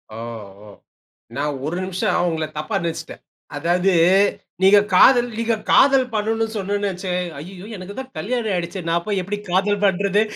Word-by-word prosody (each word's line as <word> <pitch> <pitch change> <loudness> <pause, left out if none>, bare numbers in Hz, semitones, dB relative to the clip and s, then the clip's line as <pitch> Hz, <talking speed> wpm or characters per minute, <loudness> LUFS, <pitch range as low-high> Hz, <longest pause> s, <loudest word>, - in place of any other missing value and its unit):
ஓ! - - -8 0.5
ஓ! - - -14 0.7
நான் 145 +1 -2
1 165 +4 -3
நிமிஷம் 185 -1 -1
உங்களை 160 -2 -2
தப்பா 155 +6 -3
நினைச்சிட்டேன், 165 -1 -5 0.4
அதாவது 175 +5 +1 0.7
நீங்க 195 +2 +7
காதல் 245 +6 +6
நீங்க 230 0 +1 0.2
காதல் 270 -1 +5
பண்ணனு 225 +1 0
சொன்னோன 205 +1 -1
வச்சு 185 0 -5 0.3
ஐய்யயோ 180 +5 -10
எனக்கு 185 +2 -8
தான் 265 0 -9
கல்யாணம் 230 0 -2
ஆயிடுச்சே, 175 +1 -3
நான் 170 +1 0
போய் 200 -3 0
எப்படி 205 +3 -4
காதல் 200 +3 +1
பண்றது? 200 +1 +2
195 Hz, 150 wpm, -21 LUFS, 175-210 Hz, 0.7 s, நீங்க